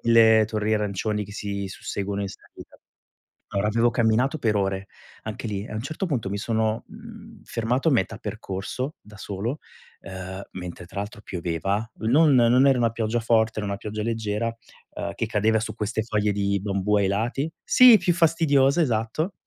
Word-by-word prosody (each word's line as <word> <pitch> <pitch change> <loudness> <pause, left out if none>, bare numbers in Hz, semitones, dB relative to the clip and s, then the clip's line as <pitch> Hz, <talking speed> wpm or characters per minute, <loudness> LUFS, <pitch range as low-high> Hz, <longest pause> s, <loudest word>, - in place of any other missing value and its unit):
le 110 -1 +6
torri 110 0 0
arancioni 105 0 -1
che 100 - -11
si 100 -1 -4
susseguono 100 +1 -4
in 100 - -3
salita. 95 - -14 0.8
Allora, 100 +1 0
avevo 115 +2 +3
camminato 120 +5 +2
per 110 -4 +1
ore, 95 -1 -1 0.4
anche 110 +2 -5
lì, 100 -1 -3
a - - -8
un 110 - -3
certo 155 +8 -4
punto 125 - -2
mi 100 - -2
sono, 110 +1 -1
mhmm, - - -12
fermato 125 +7 0
a - - +1
metà 115 -8 +1
percorso 110 +9 -5
da 105 0 -15
solo, 105 +9 -4 0.4
uhm, 95 0 -7
mentre 90 -1 -7
tra 90 - -7
l'altro 105 +1 -6
pioveva, 95 +5 -2
non 145 +7 +4
non 125 +3 +5
era 135 - +4
una 115 -1 +2
pioggia 115 +1 -1
forte, 110 -1 +2
era 105 - -3
una 100 - -2
pioggia 105 +1 -5
leggera, 110 -1 -1 0.5
uhm, - - -4
che - - -1
cadeva 110 +1 +2
su 115 - -4
queste 110 +1 -2
foglie 105 -2 0
di 100 0 0
bambù 100 +1 0
ai 100 -1 +2
lati 120 +10 -1
sì, 250 -3 +8
più 175 -2 +1
fastidiose, 160 -3 +3
esatto. 125 - -1
110 Hz, 175 wpm, -25 LUFS, 100-120 Hz, 0.8 s, sì